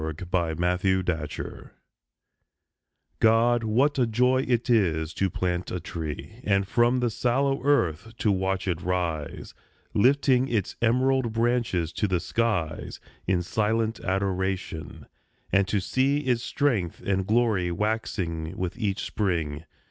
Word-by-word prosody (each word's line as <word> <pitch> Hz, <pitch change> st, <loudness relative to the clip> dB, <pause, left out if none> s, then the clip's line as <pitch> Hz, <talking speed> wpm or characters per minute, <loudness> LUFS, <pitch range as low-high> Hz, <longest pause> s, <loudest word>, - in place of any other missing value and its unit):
GO 80 Hz, 0 st, -3 dB
PLANT 85 Hz, -3 st, -1 dB
A 90 Hz, -3 st, +1 dB
TREE -, -, -8 dB, 1.5 s
God, 115 Hz, +1 st, +4 dB
what 130 Hz, +7 st, +2 dB
a 125 Hz, -, +3 dB
joy 125 Hz, +3 st, +2 dB
it 120 Hz, -1 st, +1 dB
is 85 Hz, -, +2 dB
to 95 Hz, -, 0 dB
plant 90 Hz, 0 st, -2 dB
a 90 Hz, -, -3 dB
tree, 85 Hz, +7 st, -6 dB
And 100 Hz, -1 st, +1 dB
from 120 Hz, +3 st, +2 dB
the 120 Hz, -2 st, +1 dB
sallow 135 Hz, +4 st, 0 dB
earth 115 Hz, -, +1 dB
to 105 Hz, -, +2 dB
watch 95 Hz, 0 st, -1 dB
it 85 Hz, -2 st, -1 dB
rise, 85 Hz, -4 st, -3 dB, 0.4 s
Lifting 130 Hz, +2 st, +3 dB
its 110 Hz, -7 st, -1 dB
emerald 125 Hz, 0 st, +2 dB
branches 115 Hz, -8 st, 0 dB
to 105 Hz, -, 0 dB
the 90 Hz, -2 st, +1 dB
skies 95 Hz, -8 st, -2 dB, 0.3 s
In 90 Hz, -2 st, +1 dB
silent 110 Hz, +4 st, 0 dB
adoration; 95 Hz, -3 st, -2 dB, 0.5 s
and 95 Hz, 0 st, +3 dB
to 100 Hz, +1 st, +1 dB
see 135 Hz, +8 st, +1 dB
Its 125 Hz, -4 st, 0 dB
strength 120 Hz, -, -1 dB
and 95 Hz, -1 st, 0 dB
glory 110 Hz, -6 st, +2 dB
waxing 90 Hz, -4 st, -2 dB
with 90 Hz, +2 st, -3 dB
each 100 Hz, -4 st, -1 dB
spring. 80 Hz, -6 st, -2 dB
100 Hz, 135 wpm, -26 LUFS, 90-120 Hz, 1.5 s, God